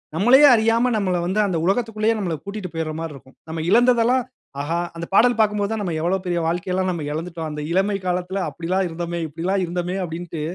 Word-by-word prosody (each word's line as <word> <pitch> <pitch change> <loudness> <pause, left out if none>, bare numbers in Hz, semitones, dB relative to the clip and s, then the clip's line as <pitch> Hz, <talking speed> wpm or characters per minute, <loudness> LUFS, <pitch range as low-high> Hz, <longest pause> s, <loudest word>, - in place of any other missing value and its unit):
நம்மளயே 245 - +6
அறியாம 230 +2 +2
நம்மள 185 -4 0
வந்து 190 +4 0
அந்த 180 -4 -1
உலகத்துக்குள்ளயே, 220 +2 +1
நம்மள 175 -5 -2
கூட்டிட்டு 200 -3 -6
போயிர்ர 160 -1 -2
மாரி 165 -2 -5
இருக்கும். 130 -1 -16
நம்ம 160 0 -3
இழந்ததெல்லாம் 245 +2 +4 0.4
ஆஹா! 165 +4 -1 0.2
அந்த 170 0 -5
பாடல் 240 +3 +5
பாக்கும்போது 210 -1 +1
தான் 220 - -2
"நம்ம 175 - -2
எவ்ளோ 180 +3 +1
பெரிய 175 -1 0
வாழ்க்கை 175 +2 -2
எல்லாம் 185 0 0
நம்ம 170 -4 -4
இழந்துட்டோம். 165 +1 -4
அந்த 150 - -5
இளமை 195 +2 +1
காலத்துல 180 +2 -1
அப்டியெல்லாம் 185 +3 -1
இருந்தோமே! 170 +1 -4
இப்டி 155 +2 -10
எல்லாம் 190 +2 +1
இருந்தோமே!" 175 +1 -3
அப்டின்னுட்டு 165 -1 -5
185 Hz, 195 wpm, -22 LUFS, 170-210 Hz, 0.4 s, நம்மளயே